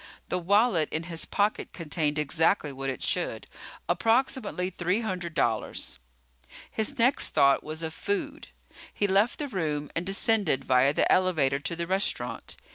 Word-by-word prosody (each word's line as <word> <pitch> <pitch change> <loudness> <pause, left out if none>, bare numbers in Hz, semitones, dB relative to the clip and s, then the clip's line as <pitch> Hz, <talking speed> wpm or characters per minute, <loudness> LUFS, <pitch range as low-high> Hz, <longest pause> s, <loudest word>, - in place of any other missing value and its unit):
The 180 - 0
wallet 200 -2 +2
in 160 - -2
his 165 -1 -3
pocket 205 +1 -1
contained 155 -2 -1
exactly 150 0 +1
what 135 0 -4
it 130 - -4
should, - - -1 0.4
approximately 225 -6 0
three 180 +4 -1
hundred 180 -6 -4
dollars. 115 - -1 0.7
His 220 +6 0
next 250 +3 +2
thought 140 0 +4
was 155 +2 -5
of 160 -1 -4
food. 315 - -3 0.4
He 205 - 0
left 200 +5 +2
the 295 - -3
room 155 - -3
and 165 - 0
descended 195 - +2
via 130 +2 +4
the - - +2
elevator 155 -8 +2
to 170 +4 -3
the 170 0 -2
restaurant. 190 +3 -2
175 Hz, 150 wpm, -27 LUFS, 150-210 Hz, 0.7 s, thought